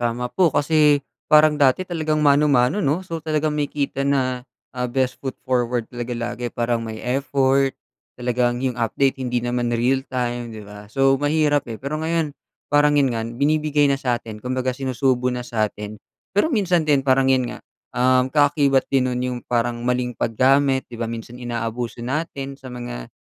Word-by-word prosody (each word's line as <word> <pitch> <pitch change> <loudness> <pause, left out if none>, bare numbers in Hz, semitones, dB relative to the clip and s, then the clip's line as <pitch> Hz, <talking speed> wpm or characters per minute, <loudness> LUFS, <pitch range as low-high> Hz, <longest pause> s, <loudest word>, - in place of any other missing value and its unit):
Tama 120 +1 -2
po, 180 -4 +2
kasi 150 -1 +3 0.2
parang 155 0 +5
dati 140 +5 +4
talagang 155 -4 -1
mano-mano, 140 +1 +4
'no? 165 0 0
So 165 -3 -5
talagang 155 -1 -1
makikita 140 -1 -1
na, 130 -2 0 0.2
ah, 125 0 -3
best 130 +1 -1
foot 135 -2 -5
forward, 125 -2 -1
talaga 120 0 -4
lagi. 120 +1 -4
Parang 120 -1 -1
may 110 0 -7
effort, 135 +1 +1 0.4
talagang 125 0 0
'yung 125 -2 -1
update, 130 +4 +1
hindi 125 -2 -1
naman 120 -1 -1
real 130 +3 +1
time, 120 -2 -3
'di 110 - -8
ba? 105 0 -11
So 135 +4 +2
mahirap, 145 -1 +1
eh. 115 0 -7
Pero 150 +3 -3
ngayon, 160 -1 -1 0.4
parang 145 0 +4
'yon 140 -3 +3
nga, 115 -1 -2
binibigay 145 +3 +1
na 135 - +1
sa 125 -3 -1
'tin, 110 -2 -8
kumbaga 130 +3 -2
sinusubo 125 -1 0
na 125 - -4
sa 110 -3 0
'tin. 105 0 -8 0.3
Pero 205 +10 +2
minsan 185 - +1
din, 140 -3 +3
parang 130 0 +3
'yon 130 -2 +2
nga, - - -8 0.3
um, 130 +1 +2
kaakibat 145 -2 +3
din 130 -2 +1
no'n 125 - -2
'yung 125 0 -2
parang 120 0 0
maling 125 0 -1
paggamit, 130 +4 +2
'di 120 - -12
ba? 115 0 -3
Minsan 120 +2 -8
inaabuso 120 0 -4
natin 140 -1 -3
sa 130 -2 -11
mga 120 - -7
130 Hz, 175 wpm, -22 LUFS, 120-145 Hz, 0.4 s, parang